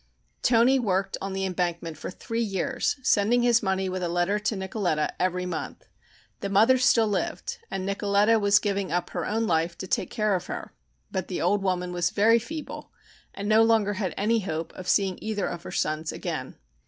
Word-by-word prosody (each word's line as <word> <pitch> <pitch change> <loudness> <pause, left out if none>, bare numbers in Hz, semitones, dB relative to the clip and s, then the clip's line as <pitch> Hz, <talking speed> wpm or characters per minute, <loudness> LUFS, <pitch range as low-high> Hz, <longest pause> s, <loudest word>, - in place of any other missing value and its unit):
Toni 250 +3 +4
worked 195 -4 0
on 195 0 -4
the 195 0 -1
embankment 175 -3 -2
for 155 - -7
three 230 +5 -4
years, 230 +5 -1
sending 240 0 +3
his 240 -1 +4
money 190 -2 0
with 185 0 -3
a 175 - -1
letter 175 +4 +1
to 215 +1 -1
Nicoletta 190 -5 -1
every 180 0 0
month. 170 -3 -5 0.5
The 200 - -3
mother 225 +6 +5
still 230 -3 +4
lived 205 -2 -3
and 190 -1 -3
Nicoletta 205 +2 +2
was 205 0 +5
giving 200 -3 -1
up 175 +1 -1
her - - -3
own 225 +2 0
life 165 -2 0
to - - -5
take - - -1
care 215 -3 0
of 180 - -2
her, - - -6 0.4
but 185 -1 -3
the 180 - -3
old 195 +4 +2
woman 180 -2 -1
was 175 -1 +1
very 225 +3 +4
feeble 305 +6 -7 0.4
and 200 +1 -4
no 215 +1 +5
longer 225 -2 +3
had 190 -3 -3
any 225 +3 +2
hope 165 -5 -4
of 185 - -9
seeing 195 -3 +2
either 215 -2 -2
of 170 - -4
her - - -8
sons 155 +1 -1
again. - - -5
195 Hz, 195 wpm, -26 LUFS, 180-220 Hz, 0.5 s, mother